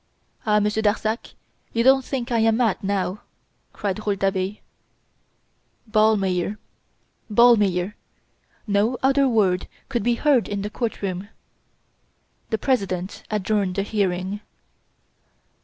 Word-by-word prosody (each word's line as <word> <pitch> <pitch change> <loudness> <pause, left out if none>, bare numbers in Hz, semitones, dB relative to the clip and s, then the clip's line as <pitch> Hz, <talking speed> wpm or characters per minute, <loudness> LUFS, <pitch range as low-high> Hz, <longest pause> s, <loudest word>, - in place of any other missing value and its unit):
"Ah! 210 0 +4
Monsieur 210 +1 0
Darzac; 220 +2 -1 0.4
you 230 - +2
don't 265 +1 +5
think 255 -1 -4
I 235 - +2
am 225 0 +3
mad, 230 -6 +1
now!" 195 0 -1 0.5
cried 200 0 -3
Rouletabille. 195 -1 -1 1.3
Ballmeyer! 210 -3 +2 0.7
Ballmeyer! 205 -5 +4 0.7
No 210 +4 +1
other 275 +1 +4
word 195 -7 +2 0.2
could 240 -3 -1
be 240 0 +2
heard 270 -2 +2
in 200 -1 -3
the 210 - -4
courtroom. 200 -5 -3 1.2
The 220 - 0
President 195 -7 -1
adjourned 205 -2 0
the 195 - 0
hearing. 195 -1 -1
210 Hz, 105 wpm, -23 LUFS, 195-230 Hz, 1.3 s, don't